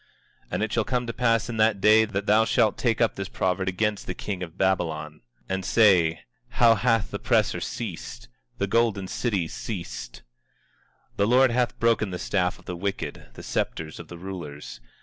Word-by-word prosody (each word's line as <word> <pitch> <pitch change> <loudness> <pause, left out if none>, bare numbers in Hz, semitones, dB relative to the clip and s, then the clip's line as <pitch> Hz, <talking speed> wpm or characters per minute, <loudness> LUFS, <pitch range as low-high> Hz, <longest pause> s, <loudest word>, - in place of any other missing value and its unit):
24:4 - - -35
And - - 0
it 110 - -2
shall 115 - +2
come 125 +1 -1
to 115 - -4
pass 115 -2 +1
in 120 -2 -5
that 110 -1 +3
day, 110 +2 +6
that 100 -2 -3
thou 105 +2 +5
shalt 110 -1 +2
take 115 -3 0
up 115 - +3
this 95 -1 -5
proverb 95 +1 -1
against 105 +2 -1
the 90 - -4
king 95 -3 -5
of 85 0 -7
Babylon, 80 -5 -1 0.3
and 95 0 -2
say: 90 -7 +4 0.4
How 120 -3 +7
hath 115 0 +1
the - - -3
oppressor - - +1
ceased, - - -6 0.3
the 100 - 0
golden 100 -2 +1
city 100 -6 -1
ceased! 85 - -7 0.9
24:5 - - -36
The 100 - +2
Lord 130 +2 +5
hath 125 0 0
broken 115 -3 +2
the 90 - -4
staff 90 -1 -1
of - - -20
the 90 - -5
wicked, 95 +3 -4
the - - -10
scepters 80 -1 -3
of 85 - -9
the 85 - -9
rulers. 80 -9 -8
100 Hz, 190 wpm, -25 LUFS, 90-115 Hz, 0.9 s, How